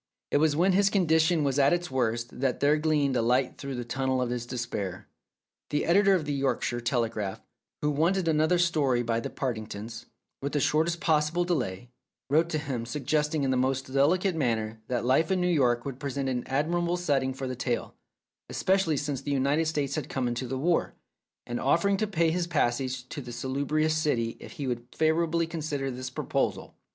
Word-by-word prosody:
It - - +4
was 150 0 +3
when 180 +5 +3
his 200 +1 +4
condition 160 -4 +3
was 140 0 +1
at 140 +2 +5
its 175 -3 -2
worst 120 -2 -1
that 130 -2 0
there 145 +1 +4
gleamed 150 -3 +1
a 120 - +2
light 125 +3 +1
through 140 -1 -5
the 120 -1 -4
tunnel 130 +1 -1
of 125 -1 -1
his 120 -1 -3
despair. 105 -7 -4 0.6
The 150 - 0
editor 195 +3 +5
of 165 -5 -1
the 145 - -2
Yorkshire 130 -3 -1
Telegraph, 115 -5 -1 0.4
who 150 - +2
wanted 170 +5 +1
another 160 +2 +3
story 145 -8 +2
by 115 -1 0
the - - -4
Partingtons, 115 -3 -5 0.3
with 140 +1 -3
the 145 - +2
shortest 160 +4 +1
possible 160 -1 +2
delay, 120 - -2 0.4
wrote 160 +3 +3
to 155 - -1
him 130 -6 -4
suggesting 150 +3 0
in 135 - +1
the 130 - +2
most 130 +1 -1
delicate 175 +7 +3
manner 110 -6 -1
that 120 -1 -1
life 135 +6 +3
in 190 -1 +2
New 180 - +1
York 125 -8 +2
would 135 -2 -5
present 140 -1 -3
an 125 -2 -2
admirable 170 +5 0
setting 140 -7 +1
for 135 +1 -5
a 130 - -3
tale, 125 -1 -2 0.6
especially 185 -5 +1
since 140 -2 -2
the 145 - -6
United 140 +3 +1
States 145 -3 -1
had 150 -2 -3
come 130 -2 -1
into 120 +1 -2
the 130 +2 -3
war, 165 +5 +1 0.5
and 120 0 -3
offer 170 +8 +2
ing 200 - +2
to 215 - 0
pay 165 -5 +2
his 175 0 -1
passage 125 -4 0
to 145 - -5
that 120 -2 -8
salubrious 145 +5 0
city 120 -7 0
if - - -10
he 145 - -5
would 120 -2 -3
favourably 165 +1 +2
consider 150 -4 -3
this 130 +1 -5
proposal. 130 - -2
140 Hz, 195 wpm, -28 LUFS, 125-160 Hz, 0.6 s, at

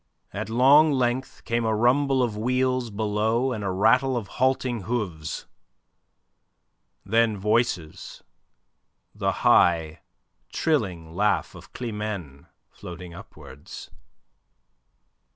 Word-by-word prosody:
At - - -5
long 140 +7 +5
length 130 -1 -2
came 115 0 -1
a 110 -1 +1
rumble 130 +3 +2
of 115 -4 -2
wheels 125 +2 0
below 110 +4 0
and 110 -4 -4
a 100 - -1
rattle 125 +7 +2
of 105 -6 -5
halting 130 -2 +1
hooves. 95 -10 -4 1.6
Then 110 +1 +2
voices, 105 -6 -2 0.9
the - - -1
high, 80 -2 +3 0.5
trilling 90 - -1
laugh 105 +4 0
of - - -14
Climene 105 - -6 0.2
floating 90 0 -10
upwards. 70 -4 -12
110 Hz, 100 wpm, -25 LUFS, 95-125 Hz, 1.6 s, long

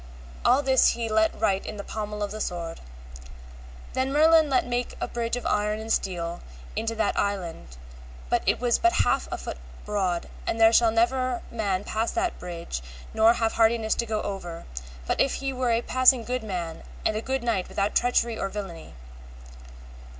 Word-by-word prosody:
All 260 +4 +4
this 265 -1 +4
he 230 -1 -2
let 220 0 +2
write 195 0 +1
in 210 - -6
the 200 - -5
pommel 210 -1 -4
of 205 - -3
the 215 0 -5
sword. 170 -3 -4 1.1
Then 260 +1 0
Merlin 315 +1 +5
let 260 -2 +2
make 245 0 -2
a - - -2
bridge 235 0 -2
of 245 - -5
iron 210 0 +1
and 220 +1 -7
of - - +3
steel 170 -2 -2 0.3
into 225 0 -2
that 220 -2 0
island, 170 - -3 0.5
and - - +3
it - - +3
was 240 -1 +2
but 350 0 +3
half - - +1
a - - -2
foot - - -6 0.3
broad, 190 -4 -1 0.2
and 225 - -1
there 225 0 +6
shall 230 0 +6
never 245 +2 +1
man 200 -4 -1
pass 220 +2 -1
that 350 0 -1
bridge, 170 - -5 0.3
nor 225 +1 +5
have 225 -1 0
hardiness 225 -1 +3
to 235 - -2
go 215 -1 -1
over, 175 -4 -5 0.4
but - - +1
if 275 - +2
he 275 0 -3
were 255 -1 -1
a 230 0 +2
passing 255 -1 +5
good 250 +2 -2
man 175 -6 -4 0.2
and 215 - +2
a 215 - -1
good 265 +1 -2
knight 220 -6 0
without 200 +1 -1
treachery 235 -2 +2
or 195 - -1
villainy. 190 - -7
220 Hz, 185 wpm, -26 LUFS, 195-245 Hz, 1.1 s, there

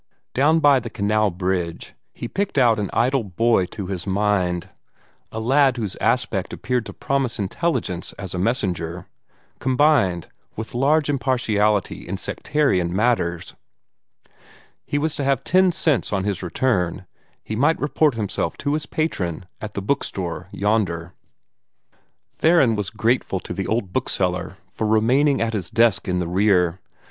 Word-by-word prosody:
Down 150 +5 +4
by 145 -3 +5
the 115 -1 -7
canal 105 0 +1
bridge 90 -2 -3 0.2
he - - -6
picked 200 +3 -2
out 120 -5 +4
an 100 - -2
idle 130 +2 +1
boy 100 0 +1
to 100 0 -6
his 90 0 -5
mind 95 -3 0 0.6
a 110 - -4
lad 130 +2 +3
whose 105 -5 -3
aspect - - 0
appeared 125 -3 -2
to - - -8
promise 135 -3 -1
intelligence 105 - -2
as 95 -3 -7
a 90 - -3
messenger, 90 -6 -1 0.5
combined 130 - +2 0.3
with 110 +1 -6
large 145 +5 +2
impartiality 110 -10 0
in 95 +2 -3
sectarian 95 - 0
matters. 95 -5 0 1.3
He 145 - -1
was 155 +1 0
to 145 - -2
have 135 -2 +1
ten 185 0 +4
cents 155 -6 +1
on 100 -2 0
his 100 -3 -2
return; 90 -1 0
and - - -21 0.4
he 110 - -4
might 145 +8 +2
report 145 -2 +2
himself 105 -3 -2
to 145 0 -1
his 150 -2 -2
patron 95 - -2 0.2
at 105 -1 -6
the 100 - -3
bookstore 95 -7 -2
yonder. 95 -5 -1 1.2
Theron 155 -9 +4
was 105 -3 -2
grateful 115 -4 0
to - - -6
the 95 - -3
old 110 -5 -1
bookseller - - -1
for 110 - -2
remaining 125 +7 +3
at 115 0 0
his 95 -5 -3
desk 115 -4 +2
in 90 -1 0
the 90 -1 -1
rear. 90 -1 +2
110 Hz, 150 wpm, -22 LUFS, 95-135 Hz, 1.3 s, by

